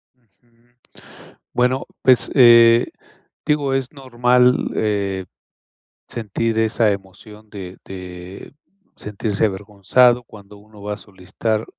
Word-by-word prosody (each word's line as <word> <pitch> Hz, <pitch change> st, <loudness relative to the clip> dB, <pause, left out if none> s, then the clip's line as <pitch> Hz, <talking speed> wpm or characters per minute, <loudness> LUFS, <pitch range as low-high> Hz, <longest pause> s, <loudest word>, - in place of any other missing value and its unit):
Ujú. 120 Hz, +1 st, -36 dB, 0.8 s
Bueno, 125 Hz, +2 st, 0 dB, 0.2 s
pues, 130 Hz, -2 st, +3 dB
eh, 115 Hz, -2 st, +6 dB, 0.6 s
digo, 145 Hz, -3 st, 0 dB
es 135 Hz, -1 st, -2 dB
normal, 125 Hz, -2 st, +2 dB, 0.2 s
eh, 100 Hz, -3 st, -2 dB, 0.8 s
sentir 115 Hz, 0 st, -3 dB
esa 110 Hz, -1 st, +2 dB
emoción 100 Hz, +2 st, -10 dB
de 95 Hz, -3 st, -9 dB
de 90 Hz, +1 st, -10 dB, 0.4 s
sentirse 105 Hz, 0 st, -4 dB
avergonzado 105 Hz, +5 st, +2 dB
cuando 105 Hz, -2 st, -15 dB
uno 105 Hz, 0 st, -17 dB
va 105 Hz, +1 st, -4 dB
a -, -, -7 dB
solicitar 105 Hz, +3 st, -4 dB
110 Hz, 100 wpm, -20 LUFS, 100-120 Hz, 0.8 s, eh